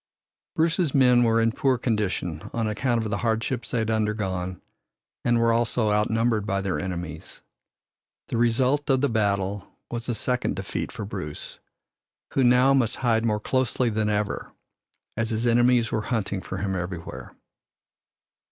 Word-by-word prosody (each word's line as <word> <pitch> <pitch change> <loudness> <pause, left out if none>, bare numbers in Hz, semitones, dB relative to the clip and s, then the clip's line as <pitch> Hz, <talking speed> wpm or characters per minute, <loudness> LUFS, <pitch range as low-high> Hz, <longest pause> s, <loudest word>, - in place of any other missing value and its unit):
Bruce's 165 -2 +1
men 125 -2 +5
were 115 -1 +3
in 115 0 +3
poor 130 +1 +1
condition 100 -9 -2
on 115 -2 0
account 115 +2 0
of 110 - -4
the 100 - -1
hardships 115 +2 -1
they - - -1
had 110 0 0
undergone 95 -5 -1 0.6
and 120 0 +3
were 115 0 +3
also 115 -1 +1
outnumbered 110 +1 +1
by 100 -2 -1
their 95 -2 -2
enemies. 85 -4 -6 0.9
The - - -1
result 130 +5 +2
of 130 -1 +3
the 140 - +2
battle 100 -3 0 0.2
was 120 +1 -4
a 120 - 0
second 125 +3 -1
defeat - - -4
for 105 - -6
Bruce, 90 -7 -7 0.7
who 135 - +3
now 125 +2 +5
must 125 -5 +2
hide 115 -3 +1
more 105 -2 +1
closely 125 +1 0
than 110 0 0
ever, 105 -1 -2 0.6
as 115 0 -1
his 115 +1 -1
enemies 120 0 +3
were 110 - 0
hunting 105 -4 -2
for 95 - -6
him 95 0 -2
everywhere. 90 -2 -6
115 Hz, 155 wpm, -25 LUFS, 100-120 Hz, 0.9 s, men